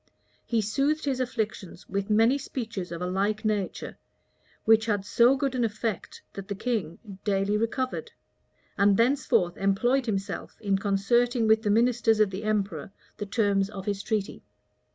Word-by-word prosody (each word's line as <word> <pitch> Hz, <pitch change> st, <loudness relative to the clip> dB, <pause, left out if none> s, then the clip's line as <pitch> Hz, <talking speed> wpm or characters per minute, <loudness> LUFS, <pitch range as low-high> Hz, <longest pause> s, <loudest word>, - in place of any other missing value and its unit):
He 230 Hz, -2 st, +1 dB
soothed 280 Hz, +9 st, 0 dB
his 270 Hz, -2 st, -1 dB
afflictions 220 Hz, -7 st, -4 dB
with 200 Hz, +1 st, -3 dB
many 225 Hz, +6 st, +4 dB
speeches 225 Hz, -10 st, -5 dB
of 170 Hz, +1 st, -4 dB
a -, -, -1 dB
like 200 Hz, +4 st, -1 dB
nature, 210 Hz, -3 st, -2 dB, 0.7 s
which 225 Hz, +1 st, +5 dB
had 205 Hz, -3 st, 0 dB
so 240 Hz, +5 st, +4 dB
good 275 Hz, 0 st, -1 dB
an 250 Hz, -2 st, 0 dB
effect 220 Hz, -2 st, -3 dB
that 195 Hz, -1 st, -8 dB
the 200 Hz, -, -3 dB
king 195 Hz, -7 st, -2 dB, 0.3 s
daily 200 Hz, 0 st, +1 dB
recovered;[*] 230 Hz, +4 st, -2 dB, 0.7 s
and 200 Hz, 0 st, +5 dB
thenceforth 230 Hz, -7 st, +2 dB
employed 240 Hz, +7 st, +1 dB
himself 195 Hz, -3 st, -4 dB
in 200 Hz, -2 st, 0 dB
concerting 225 Hz, +4 st, +2 dB
with 220 Hz, 0 st, +4 dB
the 210 Hz, -, -1 dB
ministers 230 Hz, 0 st, +3 dB
of 210 Hz, -2 st, +3 dB
the 195 Hz, +3 st, -5 dB
emperor 210 Hz, -2 st, -1 dB, 0.3 s
the 205 Hz, -, -5 dB
terms 200 Hz, -2 st, +1 dB
of 195 Hz, -3 st, -8 dB
his 200 Hz, -1 st, -2 dB
treaty. 210 Hz, -1 st, -2 dB
215 Hz, 155 wpm, -27 LUFS, 195-235 Hz, 0.7 s, which